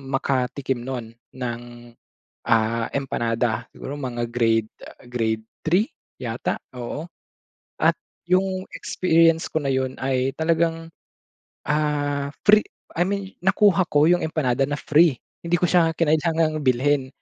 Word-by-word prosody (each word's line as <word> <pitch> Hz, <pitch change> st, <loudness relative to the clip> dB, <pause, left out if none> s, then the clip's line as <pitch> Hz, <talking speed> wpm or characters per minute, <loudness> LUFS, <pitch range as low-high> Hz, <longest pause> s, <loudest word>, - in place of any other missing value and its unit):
makatikim 135 Hz, -1 st, -1 dB
no'n 120 Hz, -3 st, -5 dB, 0.2 s
ng, 120 Hz, -2 st, -4 dB, 0.8 s
ah, 115 Hz, 0 st, +2 dB
empanada. 120 Hz, -3 st, -1 dB
Siguro, 140 Hz, -, -7 dB
mga 120 Hz, -4 st, -3 dB
grade, 115 Hz, -2 st, +1 dB, 0.2 s
ah, -, -, -14 dB
grade 110 Hz, -3 st, -1 dB, 0.2 s
3 180 Hz, +8 st, +2 dB, 0.3 s
yata, 120 Hz, -1 st, -2 dB, 0.2 s
oo 135 Hz, +7 st, -5 dB, 0.8 s
at -, -, +4 dB, 0.3 s
'yong 185 Hz, 0 st, +1 dB
experience 165 Hz, -2 st, +2 dB
ko -, -, 0 dB
na 135 Hz, -, +1 dB
'yon 130 Hz, 0 st, -1 dB
ay 130 Hz, 0 st, 0 dB
talagang, 165 Hz, 0 st, 0 dB, 0.7 s
ah, 145 Hz, -2 st, 0 dB, 0.2 s
free 210 Hz, +1 st, +7 dB, 0.3 s
I 175 Hz, +2 st, +1 dB
mean 200 Hz, -1 st, -3 dB
nakuha 190 Hz, -1 st, +4 dB
ko 145 Hz, 0 st, +4 dB
'yong 175 Hz, -, +4 dB
empanada 135 Hz, -4 st, 0 dB
na 145 Hz, -, -1 dB
free 150 Hz, -1 st, +4 dB, 0.3 s
hindi 170 Hz, 0 st, -1 dB
ko -, -, 0 dB
siya 165 Hz, -2 st, +3 dB
kinailangan 160 Hz, 0 st, +1 dB
bilhin. 130 Hz, +1 st, +2 dB
145 Hz, 125 wpm, -23 LUFS, 125-165 Hz, 0.8 s, free